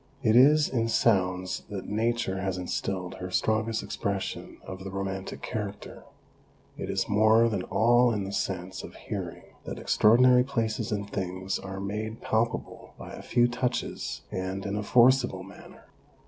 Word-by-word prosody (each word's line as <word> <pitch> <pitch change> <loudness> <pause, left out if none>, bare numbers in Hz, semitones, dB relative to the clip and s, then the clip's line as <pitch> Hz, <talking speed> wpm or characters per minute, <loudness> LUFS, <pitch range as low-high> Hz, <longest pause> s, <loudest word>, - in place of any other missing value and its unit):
It 110 -1 +4
is 145 +4 +6
in 115 -3 0
sounds 95 -5 +1
that 100 -3 -6
Nature 110 -2 0
has 95 -1 -2
instilled 90 0 -3
her 90 0 -5
strongest 110 +4 0
expression 100 -1 -4
of 95 0 -7
the 95 - -5
romantic 95 0 -5
character; 105 -3 -5 0.7
it - - -6
is - - 0
more 110 +2 +5
than 105 -5 -1
all 120 +4 +4
in 105 -3 -1
the 95 - -5
sense 95 -1 -3
of - - -10
hearing - - -6 0.2
that - - -5
extraordinary 125 +3 +5
places 115 -4 -2
and 100 -1 -2
things 95 -1 -3
are 95 0 -7
made 105 +3 -4
palpable 115 +1 -2
by - - -9
a - - -8
few 120 -1 +3
touches 125 +1 -3
and 95 +1 -3
in 100 0 -2
a 105 - -1
forcible 120 -3 +4
manner. 100 +2 -14
105 Hz, 155 wpm, -28 LUFS, 95-115 Hz, 0.7 s, is